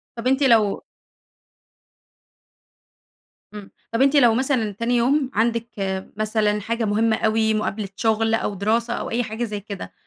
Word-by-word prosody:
طب 235 +1 -4
أنتِ 270 +2 +2
لو 225 -6 +3 2.7
امم. 205 -2 -10 0.2
طَب 230 - +1
أنتِ 275 +2 +4
لو 245 -5 +6
مثلًا 255 -4 0
تاني 230 +4 -1
يوم 265 +3 +2
عندِك 230 +1 0 0.5
مثلًا 215 -1 0
حاجة 230 +2 -2
مهمة 220 +2 +2
أوي، 220 0 +1
مقابلة 215 -1 -2
شغل 225 +1 +1
أو 215 -2 0
دراسة 230 +5 0
أو - - -4
أي 240 +1 0
حاجة 220 +2 -4
زَي 210 -3 -4
كده، 200 -1 -8
225 Hz, 145 wpm, -22 LUFS, 215-240 Hz, 2.7 s, لو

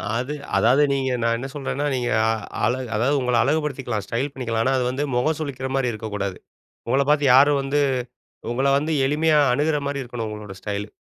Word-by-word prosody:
அது 130 +5 -2 0.2
அதாவது 130 +6 +4
நீங்க 135 -1 0
நான் 115 0 +2
என்ன 130 +3 -5
சொல்றேன்னா 140 0 -3
நீங்க 125 -1 -1 0.5
அழ 105 - +3 0.2
அதாவது 125 +7 +2
உங்கள 125 -1 0
அழகு 150 +5 +2
படுத்திக்கலாம், 130 -7 -3
ஸ்டைல் 130 +7 -2
பண்ணிக்கலாம். 115 -4 -2
ஆனா, 130 +3 +2
அது 125 - 0
வந்து 135 +3 -2
முகம் 150 +6 +1
சுளிக்கிற 135 -3 -4
மாரி 130 -3 +1
இருக்கக்கூடாது. 105 -3 -4 0.5
உங்கள 135 +3 +2
பாத்து 150 -1 +3
யாரும் 140 +1 +6
வந்து, 140 +2 0 0.7
உங்கள 130 +3 0
வந்து 155 +3 -1
எளிமையா 155 +2 +3
அணுகிற 150 +2 +1
மாரி 140 -1 -2
இருக்கணும் 120 -2 -5
உங்களோட 105 -2 -8
ஸ்டைலு. 105 0 -4
130 Hz, 180 wpm, -23 LUFS, 115-145 Hz, 0.7 s, யாரும்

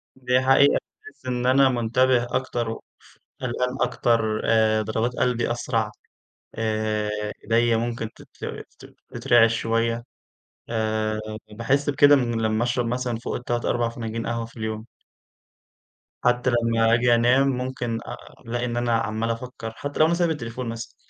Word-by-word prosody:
دي 125 -1 +1
حقيقة 135 +2 +5 0.3
باحسّ 430 - -15
إن 125 -1 -2
أنا 135 +1 +5
مُنتَبِه 125 +1 +2
أكتر 120 -3 -1
و 115 - -5 0.6
ف - - -13
قلقان 125 +1 -1
أكتر 110 -2 +1
آآ 110 -1 +3
ضربات 110 +3 -1
قلبي 120 -1 0
أسرع 115 -3 -1 0.6
آآ 110 -1 -1 0.3
أيدَيّا 115 +1 +3
ممكن 115 -1 -3
تتر - - -8 0.2
تت - - -14
تترعش 115 -1 +3
شويّة 115 +1 0 0.6
آآ 110 -1 -1 0.3
باحس 130 +7 0
بكده 145 0 +6
من 120 -4 0
لمّا 110 +1 +1
أشرب 120 0 0
مثلًا 125 -1 -2
فوق 120 - -4
ال3 120 -1 -2
4 120 -1 +1
فناجين 115 -1 -5
قهوة 115 0 -2
في 115 - -19
اليوم! 110 0 -4 1.4
حتى 125 +1 +2
لمّا 115 -1 +2
آجي 120 0 +4
أنام 125 +4 +4
ممكن 125 -3 -2
أ - - -6 0.3
ألاقي 120 +1 -2
إن 120 -1 -3
أنا 120 -1 +1
عمّال 110 +1 -2
أفكر، 115 -1 -5
حتى 145 +4 -6
لو 155 - +7
أنا 165 - +2
سايب 170 0 +2
التليفون 125 -5 -4
مثلًا 115 0 -7
120 Hz, 150 wpm, -24 LUFS, 115-125 Hz, 1.4 s, لو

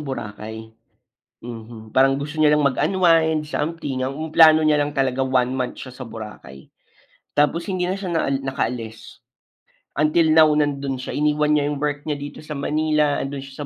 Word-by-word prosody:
Boracay. 110 -3 -7 0.7
Mhm, 115 -2 -10
parang 135 +1 +4
gusto 150 +2 -6
niya 150 -1 +5
lang 150 - +1
mag-unwind, 160 +1 +2
something. 150 -3 -3
Ang 150 +5 -4
plano 155 -1 +7
niya 150 -1 +3
lang 145 - 0
talaga 135 -1 +1
1 130 -1 +1
month 130 -1 -3
siya 130 -1 -9
sa 130 -1 -8
Boracay, 105 - -10 0.7
tapos 150 +4 +2
hindi 180 -1 -1
na 185 - 0
siya 185 -3 -5 0.3
nakaalis. 115 -4 -5 0.8
Until 155 +2 +3
now 155 0 +7
nando'n 140 -3 -1
siya, - - -5
iniwan 150 0 +2
niya 145 - +1
'yong 145 -1 -4
work 145 -1 -2
niya 150 -2 -2
dito 145 0 -8
sa 150 - -6
Manila, 150 0 +1
ando'n 135 0 -4
siya 135 +2 -8
145 Hz, 165 wpm, -22 LUFS, 130-155 Hz, 0.8 s, plano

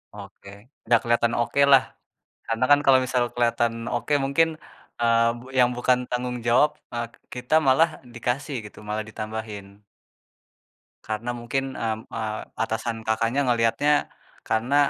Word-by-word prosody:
Oke, 100 -1 -12 0.4
dah 120 - +7
keliatan 120 0 +1
okelah, 135 +2 +4 0.7
karena 115 +2 0
kan 145 - +7
kalau 135 -1 +6
misalkan 125 -1 0
keliatan 120 -1 +1 0.2
oke 120 +5 -2
mungkin, 150 +4 +3 0.5
eee, 115 0 +3 0.2
yang 125 -1 +6
bukan 125 0 +2
tanggung 125 0 -2
jawab, 135 +6 +4 0.2
eee, 120 0 -2 0.3
kita 125 +4 -2
malah 135 +5 +5 0.3
dikasih 135 +4 -2
gitu, 105 - -12
malah 110 +1 -2
ditambahin. 110 -2 -7 1.2
Karena 110 +3 -4
mungkin, 125 +3 -2
mmm, 110 -1 -2 0.2
eee, 110 -1 -3 0.2
atasan 115 +1 -3
Kakaknya 115 +4 +1
ngeliatnya 120 +4 +2 0.6
karena 115 +5 0
120 Hz, 125 wpm, -24 LUFS, 110-125 Hz, 1.2 s, dah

